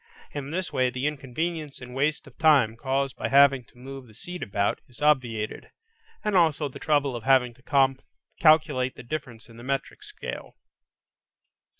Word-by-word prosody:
In 145 -1 -5
this 180 +4 -3
way 130 -1 +2
the 125 +2 -4
inconvenience 150 +2 -3
and 125 -1 -10
waste 150 +4 0
of 140 - -16
time 140 -9 +5
caused 135 +2 -1
by - - -3
having 135 -1 +6
to - - -25
move 135 0 -9
the 110 - -18
seat 180 +7 -8
about, 100 0 -1
is 125 - -18
obviated, 125 -8 0 0.5
and 210 -3 0
also 160 -4 +3
the 135 - -10
trouble 145 -4 +1
of 115 - -6
having 130 -2 +4
to 135 +1 +2 0.4
calculate 155 -5 +4
the - - -10
difference 120 -4 -6
in 115 -1 -15
the 120 - -11
metric 135 - -3
scale. 420 0 -8
135 Hz, 170 wpm, -26 LUFS, 125-150 Hz, 0.5 s, having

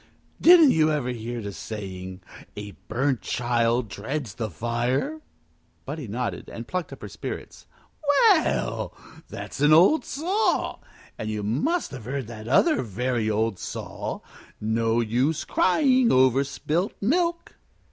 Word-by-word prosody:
"Didn't 330 -5 +8
you 155 -1 +3
ever 145 -5 -1
hear 120 -1 -4
the 100 - -4
saying, 95 -4 -7 0.4
A 105 0 -6 0.2
burnt 130 +2 0
child 120 0 0
dreads 110 +3 -4
the 110 0 -4
fire?" 120 - -1 0.6
Buddie 145 -2 -5
nodded, 120 +4 -4
and 115 0 -8
plucked 185 -2 -3
up - - -10
her - - -5
spirits. - - -7 0.6
"Well, 380 -7 +1 0.3
that's - - -7
an 150 +1 +6
old 185 - +6
saw. 360 +10 0 0.4
And 110 - -3
you 105 -1 -3
must 150 - 0
have 125 -6 -8
heard 135 +1 -3
that 110 -1 -9
other 305 - +4
very 120 0 -1
old 110 -2 0
saw, - - -5 0.4
No 115 +2 +1
use 125 +7 0
crying 265 -6 +3
over 130 +1 +4
spilt 160 +6 -2
milk." 340 - 0
125 Hz, 135 wpm, -25 LUFS, 110-165 Hz, 0.6 s, Didn't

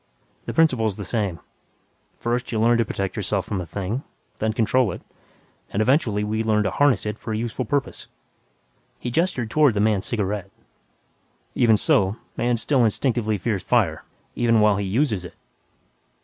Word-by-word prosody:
The - - -3
principle's 125 -11 +3
the 100 - -6
same; 100 -5 -2 0.8
First 120 +2 -2
you 110 - -1
learn 120 +1 +4
to 115 - +2
protect 95 -2 -3
yourself - - -1
from 95 -3 -3
a 85 - -7
thing; 100 - -3 0.4
then 110 0 +1
control 115 0 +2
it; - - -8 0.7
and, 100 - -3
eventually, 110 -3 +2
we 110 +1 -1
learn 105 -1 +2
to - - -1
'harness' 145 -6 +2
it 105 +1 -4
for 110 - -5
a - - -1
useful 120 +2 -3
purpose." 140 +4 -2 0.9
He 120 - -4
gestured 130 -7 0
toward 150 -7 +4
the - - 0
man's 105 -2 +1
cigarette, 105 -4 -2 1.0
"Even 115 -3 +4
so, 100 0 +2 0.2
man 120 0 +1
still 130 +2 +2
instinctively 110 -1 +1
fears 100 0 -2
fire - - +1 0.3
even 115 -2 +2
while 105 -2 +4
he 100 -1 -2
uses 110 -2 0
it. 90 - -10
110 Hz, 165 wpm, -23 LUFS, 105-120 Hz, 1.0 s, learn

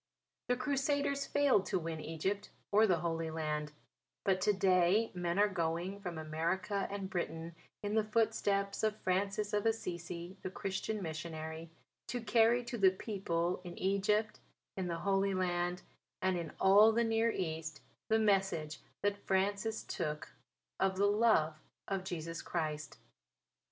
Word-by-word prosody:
The 245 - +2
Crusaders 280 +1 0
failed 280 -9 +3
to - - +1
win 165 -2 -3
Egypt 190 +7 -2 0.2
or 215 +2 +6
the 175 -5 +2
Holy 165 -1 -1
Land; 150 -1 -2 0.5
but 190 -2 +2
to 210 - +4
day 190 +2 +3
men 175 0 -1
are 205 +1 +5
going 175 +1 -2
from 175 -4 -5
America 170 +6 -1
and 200 -1 -4
Britain 170 -2 -3 0.3
in 205 0 -2
the 220 0 +3
footsteps 210 -2 +1
of 215 -1 0
Francis 200 +3 0
of 210 +1 +2
Assisi 175 -4 -3
the - - -4
Christian 195 +2 -3
missionary, 160 0 -5 0.4
to 245 - -2
carry 230 +2 +4
to 240 -1 -5
the 195 -1 +7
people 185 -3 -2
in 175 -1 -8
Egypt, 205 +3 +1 0.4
in 190 -2 -2
the 170 -1 -2
Holy 195 0 +2
Land 175 -1 0 0.4
and 185 -1 +1
in 170 -2 -3
all 205 +3 +7
the 235 +1 +2
Near 225 0 +2
East, 160 -6 -3 0.3
the 220 - +4
message 190 -8 +1 0.2
that 205 0 -1
Francis 200 +3 +1
took 150 -1 -3 0.5
of 190 0 +1
the 200 - +4
love 205 -8 +3 0.3
of 195 -2 -2
Jesus 165 -2 -4
Christ. 155 -3 -3
190 Hz, 145 wpm, -34 LUFS, 170-210 Hz, 0.5 s, the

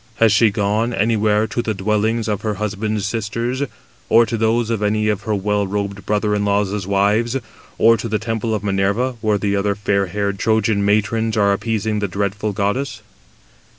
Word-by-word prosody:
Has 115 -2 +4
she 110 +3 +5
gone 105 +4 0
anywhere 105 0 +2
[to 120 - -2
the 110 -2 -2
dwellings] 110 +3 0
of 105 -2 -1
her 105 -2 -2
husband's 105 0 -2
sisters, 115 +4 -2 0.5
or 115 0 +6
[to 115 - -3
those] 115 +1 +1
of 110 -2 -1
any 105 +1 +1
of 105 -2 -1
her 105 - +2
well 100 0 0
robed 100 0 -4
brother 105 0 +1
in 105 0 0
laws' 100 -1 0
wives, 105 +5 +2 0.4
or 115 +1 +5
to 115 +2 -5
the 110 - +1
temple 115 0 -2
of 105 - -4
Minerva, 100 +5 +1
where 105 -2 +2
the 100 0 -1
other 100 0 0
fair 100 -1 0
haired 100 +1 -2
Trojan 110 -2 +1
matrons 110 +2 +1
are 100 -1 +4
appeasing 110 0 -1
the 100 - -1
dreadful 100 +2 -2
goddess?" 105 +8 -2
105 Hz, 185 wpm, -19 LUFS, 100-110 Hz, 0.5 s, or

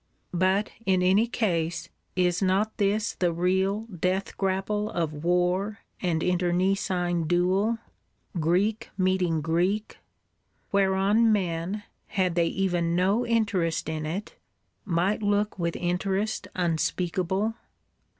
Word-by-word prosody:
But, 190 +4 +2 0.2
in 185 -1 +3
any 195 +5 +4
case, 170 -8 -1 0.3
is 180 0 +2
not 195 +3 +1
this 210 +1 +1
the 175 -2 +1
real 190 +4 +1
death 190 -2 -2
grapple 195 +2 -1
of 155 -6 -3
war 180 +4 +1 0.2
and 165 -3 0
internecine 180 -1 +1
duel, 185 +6 +2 0.6
Greek 200 +8 +1
meeting 185 -4 +1
Greek; 180 +7 0 0.7
whereon 200 +3 +3
men, 185 0 -1 0.2
had 185 -3 0
they 170 -1 +2
even 175 -3 0
no 200 +7 +2
interest 205 -10 +1
in 155 -1 -3
it, 190 +7 -5 0.5
might 185 +3 +1
look 205 -1 0
with 170 -1 -1
interest 190 +3 -1
unspeakable? 180 +4 0
185 Hz, 110 wpm, -27 LUFS, 175-205 Hz, 0.7 s, any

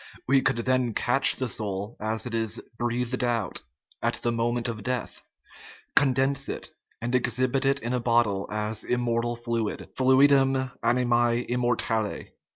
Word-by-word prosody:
We 135 +1 +4
could 135 -1 +2
then 125 -1 0
catch 130 +3 +3
the 130 - -2
soul 105 -1 -3
as 110 +2 -2
it 120 - -5
is 115 0 -1
" 115 - -34
breathed 120 +1 -1
out 115 -6 0 0.2
" 75 -4 -29
at - - 0
the 120 - -1
moment 120 +1 0
of 115 -3 -4
death, 125 +3 -3 0.7
condense 135 0 +2
it, - - -4 0.3
and 120 +2 -3
exhibit 125 +2 +1
it 135 0 +3
in 120 +2 -2
a 125 - +1
bottle 115 -5 +1
as 105 0 -2
"immortal 120 -1 0
fluid 115 -2 -3
" - - -39
(Fluidum 135 0 +4
animae 120 0 +2
immortale). 120 -3 -1
120 Hz, 160 wpm, -26 LUFS, 115-130 Hz, 0.7 s, We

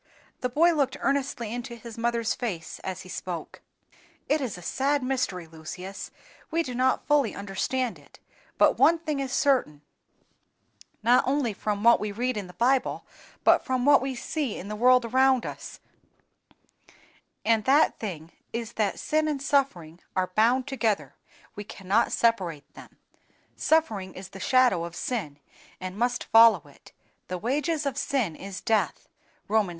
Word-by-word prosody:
The 250 - -1
boy 335 +7 +4
looked 280 -3 0
earnestly 270 -5 -1
into 240 0 -5
his 230 -1 -10
mother's 235 -1 0
face 180 -10 -5
as 190 -1 -5
he - - -12
spoke. 175 -2 -6 0.7
"It 300 +1 +2
is 240 -9 -3
a 180 - -11
sad 275 +7 0
mystery, 255 -9 -1
Lucius; 170 +4 -8 0.4
we 335 +1 +1
do 255 - -6
not 255 +1 +1
fully 290 -6 +2
understand 220 +5 -2
it; - - -20 0.4
but - - +4
one 335 - +6
thing 305 -3 -3
is 270 -2 -3
certain, 250 - +1 1.2
not 245 +3 +5
only 265 -4 +1
from 205 0 -3
what 235 +1 +6
we 210 -1 -3
read 245 +4 -1
in 205 -3 -4
the 180 - -13
Bible, 255 +5 +1 0.4
but - - +5
from 255 -1 -1
what 285 -2 +6
we 265 0 -3
see 275 0 -3
in 195 - -7
the 210 - -4
world 250 +2 +4
around 260 +1 +3
us, - - -8 1.7
and 220 -1 +2
that 285 +4 +4
thing 170 -6 -6 0.2
is 230 0 -5
that 215 -2 0
sin 310 0 0
and 295 -2 -1
suffering 265 - 0 0.2
are 185 -1 0
bound 240 +5 +3
together, 235 -7 -1 0.4
we 205 - -6
cannot 200 +2 0
separate 180 -11 0
them; - - -14 0.6
suffering 220 -13 +1
is 185 0 -9
the 195 - -11
shadow 240 -4 +3
of 170 0 -7
sin 175 - -3 0.4
and 185 0 -6
must 245 +3 0
follow 225 0 +6
it; - - -18 0.4
THE 180 - -3
WAGES 295 - -1
OF 280 -1 -1
SIN 240 - -1
IS 195 +1 -8
DEATH 220 -1 0 0.4
(Rom. 215 -1 +2
vi. - - -6
235 Hz, 160 wpm, -26 LUFS, 195-265 Hz, 1.7 s, one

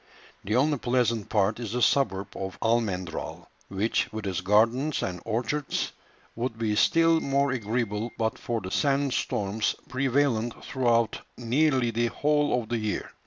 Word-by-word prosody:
The 105 +3 -1
only 145 +2 +2
pleasant 120 -4 0
part 105 +1 +1
is 115 -3 -5
the 125 - -1
suburb 100 -8 +2
of 95 0 -5
Almendral, 105 -7 -1 0.2
which, 100 +4 0
with 110 -1 -5
its 95 -1 -2
gardens 115 +9 +2
and 90 -1 -4
orchards, 120 +6 -1 0.4
would 120 -1 -3
be 110 -2 0
still 165 +7 +4
more 140 -1 +1
agreeable 115 -2 -2
but 110 -1 -1
for 115 -2 -2
the 95 0 -6
sand 140 -2 +1
storms 105 +2 -1
prevalent 130 -3 0
throughout 120 -4 +1 0.2
nearly 125 +1 +2
the 120 +1 +1
whole 145 -2 +1
of 110 - -14
the 120 -1 0
year. 110 -1 -3
115 Hz, 150 wpm, -27 LUFS, 105-130 Hz, 0.4 s, still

